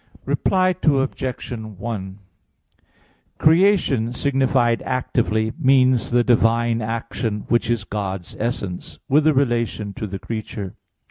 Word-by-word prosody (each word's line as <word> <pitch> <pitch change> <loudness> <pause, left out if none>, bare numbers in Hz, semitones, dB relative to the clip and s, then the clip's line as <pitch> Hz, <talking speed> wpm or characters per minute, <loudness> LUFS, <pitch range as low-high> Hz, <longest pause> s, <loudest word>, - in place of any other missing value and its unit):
Reply 185 -1 +2
Obj. 135 -4 0
1: 105 -3 -6 1.2
Creation 160 - +3
signified 130 -3 +1
actively 110 -4 -1
means 130 -2 +3
the 120 0 +3
divine 115 -1 +2
action, 110 -1 -3
which 120 -1 +1
is 120 -3 0
God's 95 -4 -5
essence, 105 -6 -4
with 150 +3 +3
a 155 - +5
relation 115 -6 0
to 110 - -5
the 95 0 -5
creature. 105 -2 -6
115 Hz, 110 wpm, -21 LUFS, 110-130 Hz, 1.2 s, a